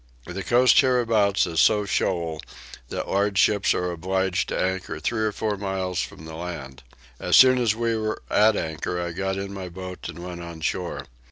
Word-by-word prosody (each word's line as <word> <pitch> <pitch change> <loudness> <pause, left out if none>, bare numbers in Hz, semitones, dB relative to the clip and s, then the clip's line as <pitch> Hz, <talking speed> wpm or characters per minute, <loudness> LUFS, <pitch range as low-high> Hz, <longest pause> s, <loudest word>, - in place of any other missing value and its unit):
The 90 +3 -5
coast 125 +4 +5
hereabouts 115 -6 +2 0.2
so 105 -1 +4
is 100 - -8
shoal 85 -4 -1 0.5
that - - -4
large 100 0 0
ships 100 0 +3
are 90 0 -1
obliged 95 +2 -1
to - - -2
anchor 95 -4 -2
three 110 +7 -1
or 110 -1 +1
four 105 0 -2
miles 95 -2 -2
from 80 - -8
the 80 - -9
land. 80 -6 -7 0.4
As 90 - +2
soon 130 -1 +7
as 115 -3 +2
we 115 0 0
were 110 -1 -3
at 110 +1 +4
anchor 80 +2 -3
I 85 -1 -3
got 95 +2 -2
in 100 0 -5
my 95 -2 -6
boat 90 +1 -8
and 85 - -8
went 90 -1 -7
on 85 -1 -9
shore. 90 +2 -3
95 Hz, 190 wpm, -24 LUFS, 85-105 Hz, 0.5 s, soon